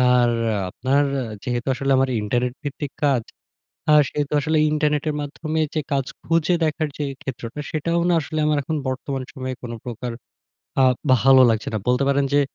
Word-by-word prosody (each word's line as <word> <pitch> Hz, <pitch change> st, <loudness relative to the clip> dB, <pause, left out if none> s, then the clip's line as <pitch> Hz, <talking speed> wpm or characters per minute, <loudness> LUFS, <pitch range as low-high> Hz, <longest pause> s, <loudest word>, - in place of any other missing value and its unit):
আর 120 Hz, -1 st, +4 dB, 0.4 s
আপনার 135 Hz, +8 st, +1 dB, 0.4 s
যেহেতু 120 Hz, -1 st, -2 dB
আসলে 135 Hz, +1 st, -1 dB
আমার 135 Hz, 0 st, +2 dB
ইন্টারনেট 120 Hz, +4 st, 0 dB
ভিত্তিক 145 Hz, 0 st, -4 dB
কাজ, 135 Hz, -4 st, +3 dB, 0.7 s
আ -, -, +7 dB, 0.2 s
সে -, -, -5 dB
তো -, -, -4 dB
আসলে 155 Hz, +3 st, +1 dB
ইন্টারনেটের 150 Hz, 0 st, +1 dB
মাধ্যমে 155 Hz, +2 st, -3 dB
যে 155 Hz, -, 0 dB
কাজ 135 Hz, -2 st, +1 dB, 0.2 s
খুঁজে 165 Hz, +1 st, +2 dB
দেখার 155 Hz, 0 st, 0 dB
যে 150 Hz, -, -2 dB, 0.2 s
ক্ষেত্রটা 125 Hz, 0 st, -6 dB
সেটাও 170 Hz, +2 st, 0 dB
না -, -, +4 dB
আসলে 155 Hz, +1 st, -4 dB
আমার 150 Hz, -1 st, +2 dB
এখন 155 Hz, +2 st, -2 dB
বর্তমান 130 Hz, +1 st, -3 dB
সময়ে 130 Hz, -1 st, -4 dB
কোন 120 Hz, -, -6 dB
প্রকার 120 Hz, 0 st, -5 dB, 0.7 s
আ -, -, +7 dB, 0.4 s
ভালো 135 Hz, 0 st, +7 dB
লাগছে 110 Hz, -1 st, -1 dB
না। -, -, +1 dB
বলতে 125 Hz, +2 st, +3 dB
পারেন 140 Hz, 0 st, +2 dB
যে 145 Hz, -, +6 dB
140 Hz, 170 wpm, -22 LUFS, 125-150 Hz, 0.7 s, আ